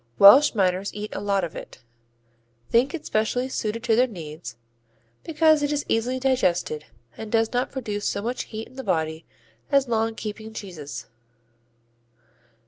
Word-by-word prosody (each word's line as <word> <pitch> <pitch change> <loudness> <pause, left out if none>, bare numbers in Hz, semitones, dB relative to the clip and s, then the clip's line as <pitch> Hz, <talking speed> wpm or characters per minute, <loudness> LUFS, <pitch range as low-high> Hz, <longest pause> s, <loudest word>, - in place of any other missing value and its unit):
Welsh 260 +8 +8
miners 190 -1 +1
eat 210 0 -5
a - - -3
lot 200 -2 0
of 170 - -4
it, - - -10 0.9
think 255 +7 +3
it 315 - -8
specially 220 +4 0
suited 230 -3 -3
to 230 -1 +3
their 250 +3 +4
needs, 155 - -8 0.7
because 315 -1 +3
it 290 0 0
is 290 -1 -1
easily 245 +3 0
digested 185 - +1 0.3
and 220 -1 -7
does 225 0 +2
not 245 +1 0
produce 210 -6 -3
so 200 - -3
much 245 +3 -2
heat 220 0 -7
in 260 - -18
the 265 - -5
body 160 -3 -1 0.4
as 275 -1 +4
long 225 -1 0
keeping 220 +1 -6
cheeses. 155 - -7
220 Hz, 155 wpm, -24 LUFS, 195-255 Hz, 0.9 s, Welsh